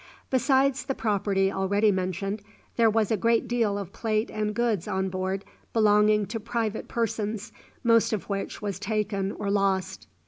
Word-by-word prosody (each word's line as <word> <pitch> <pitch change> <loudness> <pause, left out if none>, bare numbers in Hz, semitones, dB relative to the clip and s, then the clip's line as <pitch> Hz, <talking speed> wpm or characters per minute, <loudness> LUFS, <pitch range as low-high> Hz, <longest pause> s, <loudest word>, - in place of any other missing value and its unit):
Besides 265 0 +2
the 270 -1 -2
property 200 -3 +1
already 200 +3 +2
mentioned, 190 +2 -2 0.3
there 230 -1 +5
was 220 -1 +1
a - - +4
great 230 +3 +2
deal 230 -4 +1
of 200 -2 -6
plate 215 0 -1
and 210 -1 -2
goods 230 -7 0
on 190 0 -1
board 190 +1 -3 0.3
belonging 210 -1 +4
to 225 +3 -4
private 225 -1 -2
persons, 220 -2 -2 0.3
most 230 -1 +4
of 215 -4 -2
which 200 +1 -4
was 200 -3 -3
taken 205 -2 -1
or 200 -1 -3
lost. 195 -2 0
210 Hz, 160 wpm, -27 LUFS, 195-225 Hz, 0.3 s, there